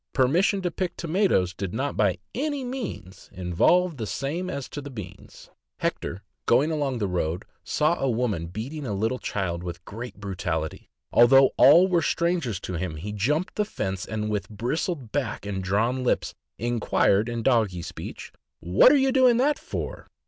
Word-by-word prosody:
Permission 175 +9 +2
to 175 - 0
pick 180 0 -3
tomatoes 165 - +1
did 95 +1 -5
not 140 +4 -2
by 100 -4 +2 0.2
any 285 +1 -2
means 245 - -6
involve 150 - +2
the 110 -3 -4
same 150 - -3
as 140 -6 -4
to 145 - -7
beans. 105 -9 -10 0.3
Hector, 95 +4 -3 0.2
going 140 +7 +4
along 145 -5 -1
the 105 -3 -1
road, 90 0 -2 0.2
saw 155 +3 +1
a 135 - +1
woman 110 -8 -1
beating 125 - -6
a 105 - -2
little 110 +6 -1
child 85 -4 -2
with 85 -1 -7
great 120 +4 -7
brutality; 90 -5 -4 0.2
although 135 +2 +7
all 160 +8 +7
were 175 -3 +2
stran 170 +2 +1
gers 115 - -3
to 95 - -5
him, 90 -3 -3
he 95 +7 -6
jumped 145 - 0
the 210 - +3
fence, 95 - -3
and 105 -1 -3
with 105 -1 -2
bristled 125 - -3
back 125 -8 -2
and 95 -2 -3
drawn 115 +7 +1
lips 125 - 0 0.2
inquired, 105 -2 +2
in 120 -1 -3
doggy 110 -9 +2
speech, - - -8
' - - -60
' - - -60
What 90 - +6
are 290 - +5
you 270 -1 +3
doing 255 -3 +5
that 290 +4 +2
for?" - - -6
120 Hz, 180 wpm, -25 LUFS, 100-165 Hz, 0.3 s, although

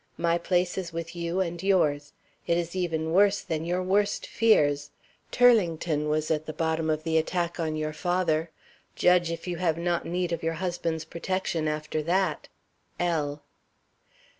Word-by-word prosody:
My 170 0 +1
place 180 +1 0
is 175 -2 -5
with 165 +1 -6
you 170 +2 -1
and 170 -2 -3
yours. 150 -7 +1 0.3
It 170 - +2
is 170 +1 -3
even 160 -3 -1
worse 200 +2 +4
than 160 -1 -3
your 180 +2 -1
worst 200 +2 +1
fears. 145 -10 +2 0.4
Turlington 170 -10 +3
was 155 +1 0
at 155 0 -1
the 155 - -4
bottom 160 0 -1
of 155 0 0
the 160 0 +2
attack 175 +1 -2
on 160 -2 -1
your 155 0 -2
father. 170 -1 0 0.5
Judge 180 -1 +4
if 165 - -5
you 175 -1 -2
have 165 -2 0
not 170 0 0
need 175 0 -2
of 170 -1 -2
your 165 0 -1
husband's 170 -2 -2
protection 170 -2 -2
after 155 0 -2
that! 185 +5 0 0.5
L." 150 -4 -1
170 Hz, 165 wpm, -27 LUFS, 155-180 Hz, 0.5 s, worse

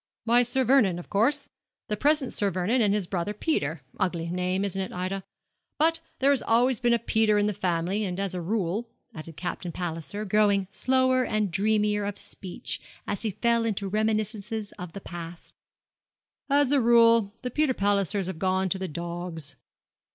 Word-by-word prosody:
'Why, 235 +2 +5
Sir 250 +2 +1
Vernon, 235 -8 +4
of 175 - -10
course 225 +8 +2 0.4
the 210 - 0
present 290 +2 +1
Sir 205 - +1
Vernon 190 +7 +1
and 210 -3 +3
his 205 -2 +1
brother 180 +3 -2
Peter: 160 - -1 0.2
ugly 175 -4 -1
name, 185 +2 0
isn't 195 -1 -2
it, 190 - -4
Ida? 185 +2 -3 0.5
but 325 +2 +3 0.2
there 275 +1 +3
has 280 - +2
always 240 +2 +3
been 240 -1 +3
a - - +2
Peter 220 -2 +2
in 205 - +3
the 210 - 0
family; 185 +1 -1
and 185 -2 -3
as 195 -2 -2
a 180 - -3
rule,' 205 +4 -1 0.2
added 155 0 -9
Captain 175 0 -4
Palliser, 175 +5 -4
growing 200 -1 +3
slower 260 +3 +2
and 215 -5 0
dreamier 210 +1 +1
of 200 0 -3
speech 185 -2 -6 0.2
as 205 - -3
he 220 - 0
fell 235 +3 +1
into 205 -3 -1
reminiscences 215 0 -1
of 180 -2 -9
the 200 - -7
past 170 -1 -9 1.0
'as 285 -1 +3
a 285 -2 +4
rule 230 -3 +5
the 250 - -3
Peter 300 -1 +1
Pallisers 200 -1 +1
have 180 -3 -5
gone 190 +1 +1
to 190 - -1
the 190 - -3
dogs. 170 -3 -5
205 Hz, 180 wpm, -27 LUFS, 180-230 Hz, 1.0 s, Why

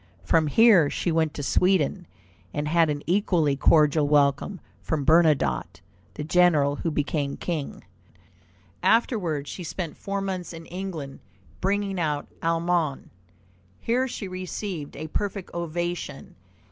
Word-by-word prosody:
From 160 -2 +2
here 190 -3 +6
she 170 - -1
went 160 -1 +1
to 145 - -4
Sweden, 180 +2 +1 0.5
and 150 0 -1
had 165 0 +3
an 145 -1 -3
equally 170 -6 +2
cordial 150 +1 +4
welcome 145 +6 +2 0.2
from 150 -3 -2
Bernadotte, 130 - +3 0.4
the 150 - -4
general 155 -4 +3
who 165 - -2
became 145 -2 -2
king. 160 -5 -4 1.0
Afterward 180 - +1
she 180 - -6
spent 170 -1 -5
four 200 0 -4
months 185 -3 -4
in 165 0 -9
England, 170 -7 -6 0.4
bringing 195 0 -1
out 150 -3 -1
Allemagne. 165 -3 0 0.7
Here 250 +3 0
she 225 -5 -6
received 185 -3 -5
a 155 - -6
perfect 195 +3 -4
ovation. 175 +1 -4
165 Hz, 125 wpm, -25 LUFS, 150-185 Hz, 1.0 s, here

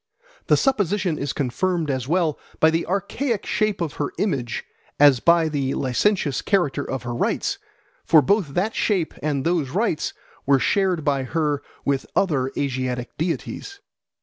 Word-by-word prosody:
The - - +5
supposition 200 - +1
is 140 -1 -2
confirmed 160 +4 -1
as 130 -2 -3
well 165 -2 +1 0.2
by 160 - +5
the 165 +1 -1
archaic 200 +5 -1
shape 215 -3 0
of 160 -4 -3
her 145 - -1
image 135 - -1 0.4
as 140 -3 +7
by 170 +3 +4
the 140 -3 -1
licentious 145 - +1
character 180 -9 +1
of 130 -2 -4
her 120 -1 -4
rites; 120 - -1 0.4
for 155 -3 +5
both 170 - +1
that 205 +5 0
shape 185 -7 0
and 140 -3 -1
those 165 -5 +1
rites 185 - -1 0.3
were 140 -1 +5
shared 185 +1 +1
by 140 -2 +1
her 150 +1 -1 0.2
with 140 -1 0
other 135 -9 +1
Asiatic 130 -2 -2
deities. 180 - -3
155 Hz, 150 wpm, -23 LUFS, 135-185 Hz, 0.4 s, as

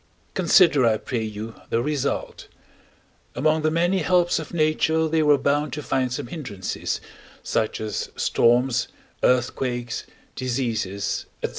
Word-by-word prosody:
Consider, 170 -6 +5
I 115 -2 +4
pray 120 +1 -3
you, 110 +1 -5 0.2
the 115 - +1
result: 145 +2 -2 0.9
among 155 +2 +2
the 155 - +2
many 175 +4 +2
helps 175 0 +2
of 160 - -7
nature 160 0 +2
they 160 0 +2
were 150 -1 +5
bound 145 0 0
to 150 - -4
find 130 -2 0
some 135 +2 -3
hindrances, 120 - -4 0.4
such 110 - -1
as 110 -1 -3
storms, 120 +1 +2 0.3
earthquakes, 125 -1 0 0.3
diseases, 115 -6 -2 0.2
&c. - - -1
135 Hz, 130 wpm, -24 LUFS, 120-155 Hz, 0.9 s, Consider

